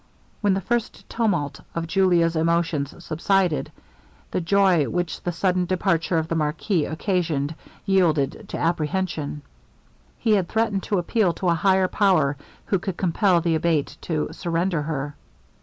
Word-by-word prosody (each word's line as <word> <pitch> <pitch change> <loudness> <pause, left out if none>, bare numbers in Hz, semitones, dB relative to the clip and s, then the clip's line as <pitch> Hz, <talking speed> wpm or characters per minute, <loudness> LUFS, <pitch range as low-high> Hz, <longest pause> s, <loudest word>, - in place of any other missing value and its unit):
When 205 -2 +3
the 195 - -1
first 240 +2 -2
tumult 175 - -1 0.2
of 165 0 -2
Julia's 170 -2 +2
emotions 165 -3 0
subsided, 175 +1 +1 0.6
the - - -1
joy 185 -3 +3
which 175 -1 -2
the 175 - -2
sudden 180 +1 +1
departure 175 -2 +1
of 160 0 0
the 165 - -2
marquis 155 +2 0
occasioned 160 -3 -1 0.3
yielded 170 -8 +1
to - - -4
apprehension. 160 -2 -1 0.7
He 225 - 0
had 195 -4 +2
threatened 220 -3 0
to 205 - +2
appeal 180 +1 +1
to 185 0 -1
a - - +4
higher 190 +2 +3
power, 180 -9 +2 0.3
who 195 -3 0
would 190 -4 -3
compel 180 0 +2
the 165 -1 +1
Abate 160 -2 0
to 155 -3 -2
surrender 170 -1 -1
her. 145 -1 -3
170 Hz, 145 wpm, -23 LUFS, 160-190 Hz, 0.7 s, a